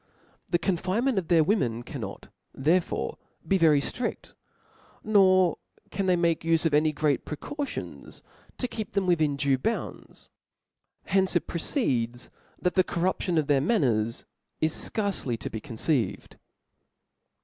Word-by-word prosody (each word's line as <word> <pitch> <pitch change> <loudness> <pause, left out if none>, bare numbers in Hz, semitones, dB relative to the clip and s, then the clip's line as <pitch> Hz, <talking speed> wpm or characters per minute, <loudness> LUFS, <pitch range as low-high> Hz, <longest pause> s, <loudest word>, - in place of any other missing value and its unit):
The 175 - +3
confine 185 +6 0
ment 260 -7 +2
of 175 - -7
their 165 -3 +5
women 125 - 0
cannot 120 -8 -7 0.3
therefore 155 - 0 0.3
be 195 +2 +3
very 155 -4 +5
ftri(St; 235 - -4 0.7
nor 185 -5 +4 0.3
can 195 -1 -2
they 180 - +4
make 170 -2 +1
ufe 165 0 +1
of 160 - +2
any 155 +1 +4
great 150 -1 0
pre 150 - -6
cautions 290 - -6 0.3
to 250 - -2
keep 220 -3 -6
them 200 -2 +1
within 155 -5 +2
due 140 -2 +1
bounds; 225 - -4 0.7
from - - -9
hence 190 -1 +2
it 175 - +2
proceeds 125 - -1 0.3
that 180 - 0
the 185 - +4
corruption 180 0 -1
of 155 - +2
their 140 -2 +3
man 215 - +2
ners 115 -2 0 0.3
is 155 0 +1
fcarcely 195 - -2
to - - -6
be 110 - -4
conceived. 115 - -2
165 Hz, 150 wpm, -27 LUFS, 140-190 Hz, 0.7 s, their